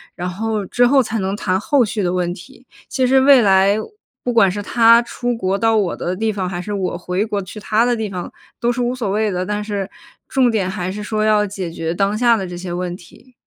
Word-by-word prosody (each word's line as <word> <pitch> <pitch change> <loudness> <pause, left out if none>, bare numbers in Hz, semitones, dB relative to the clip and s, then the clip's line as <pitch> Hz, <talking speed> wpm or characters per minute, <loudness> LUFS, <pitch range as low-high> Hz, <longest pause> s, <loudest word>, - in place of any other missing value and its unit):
然 180 +1 -4
后， 215 +2 -3
之 245 +6 +2
后 270 0 +4
才 225 0 -3
能 195 +1 -2
谈 190 -2 -1
后 275 +4 +2
续 215 -1 -2
的 175 - 0
问 175 -1 -1
题。 255 +8 -14 0.2
其 260 -1 0
实 265 +1 +4
未 265 -1 +6
来， 195 0 +4 0.5
不 245 - -1
管 225 -5 +4
是 205 +3 -4
他 230 +2 +5
出 245 0 -3
国 195 -2 -1
到 225 0 +2
我 200 -5 +1
的 180 +1 -3
地 220 +3 -1
方， 190 -3 -3
还 175 -1 -4
是 210 - -7
我 190 -3 -2
回 180 +3 -2
国 205 -2 -2
去 190 +3 -9
他 215 +2 +1
的 240 -1 +1
地 220 - -2
方， 180 -2 -6 0.3
都 235 - +2
是 245 +1 -3
无 245 +1 -1
所 230 -6 -3
谓 215 +1 0
的。 180 -1 -2
但 210 +2 -2
是 205 -2 -4 0.4
重 260 -3 +3
点 200 -5 0
还 185 -2 -3
是 210 +2 -5
说 215 0 -1
要 210 -1 +3
解 190 -3 -5
决 165 0 -4
当 200 +3 0
下 235 -1 +4
的 190 -2 -4
这 175 - -7
些 180 0 -6
问 175 0 -3
题。 200 +8 -17
210 Hz, 265 characters per minute, -19 LUFS, 185-230 Hz, 0.5 s, 未